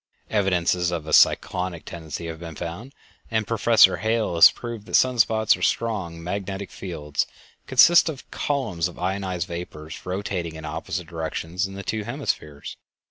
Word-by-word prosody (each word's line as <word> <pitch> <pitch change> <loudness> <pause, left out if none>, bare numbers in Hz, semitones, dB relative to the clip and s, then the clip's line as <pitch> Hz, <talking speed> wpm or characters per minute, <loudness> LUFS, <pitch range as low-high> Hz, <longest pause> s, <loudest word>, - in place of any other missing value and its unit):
Evidences 90 -3 +1
of 85 -3 -3
a - - -5
cyclonic 90 -2 +3
tendency 80 -1 -7
have 80 -1 -6
been 85 -2 -8
found, 85 - -6 0.4
and 110 -1 0
Professor 115 +1 +5
Hale 110 -3 0
has 85 0 +9
proved 115 -4 -7
that - - -1
sun 130 -2 +3
spots 110 -1 +4
are 90 - -12
strong 90 -5 -1
magnetic 95 +2 -4
fields, 75 -6 -3 0.3
and - - -42
consist 170 +7 +6
of 140 -4 -8
columns 115 - -1
of 90 - -12
ionized 95 -2 -2
vapors 85 -3 -7
rotating 90 -3 -3
in 80 0 -8
opposite 80 +3 -4
directions 80 +3 -3
in 95 - -10
the 100 - -6
two 110 +1 -2
hemispheres. 75 -7 -4
90 Hz, 160 wpm, -24 LUFS, 85-110 Hz, 0.4 s, has